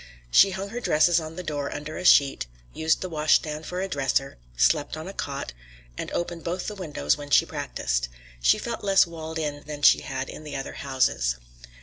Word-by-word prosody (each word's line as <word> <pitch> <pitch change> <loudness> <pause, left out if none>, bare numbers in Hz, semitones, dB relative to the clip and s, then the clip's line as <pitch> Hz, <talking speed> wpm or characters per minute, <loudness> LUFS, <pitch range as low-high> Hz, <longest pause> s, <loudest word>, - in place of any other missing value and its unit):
She 195 - +7
hung 195 +1 -4
her 235 +4 -4
dresses 170 -4 +3
on 160 0 -7
the 180 - -6
door 145 -4 -3
under 150 +1 -6
a - - -5
sheet, 140 - +5 0.3
used 160 0 +1
the 185 - -3
washstand 155 -1 +1
for 180 +1 -3
a 195 - -1
dresser, 135 - -1 0.2
slept 60 - +2
on 160 +3 -7
a 195 - -6
cot, 140 - -4 0.4
and - - -5
opened 175 -1 -3
both 175 +2 -3
the 210 - -3
windows 165 -6 -1
when 145 -1 -8
she - - +5
practiced. - - -2 0.3
She - - +5
felt 235 -2 -5
less 195 -1 +5
walled 160 -1 -7
in 145 -2 -3
than 150 -1 -7
she - - +7
had 135 -2 -4
in - - -9
the 150 -2 -7
other 135 - -5
houses. 130 - 0
155 Hz, 205 wpm, -26 LUFS, 140-175 Hz, 0.4 s, She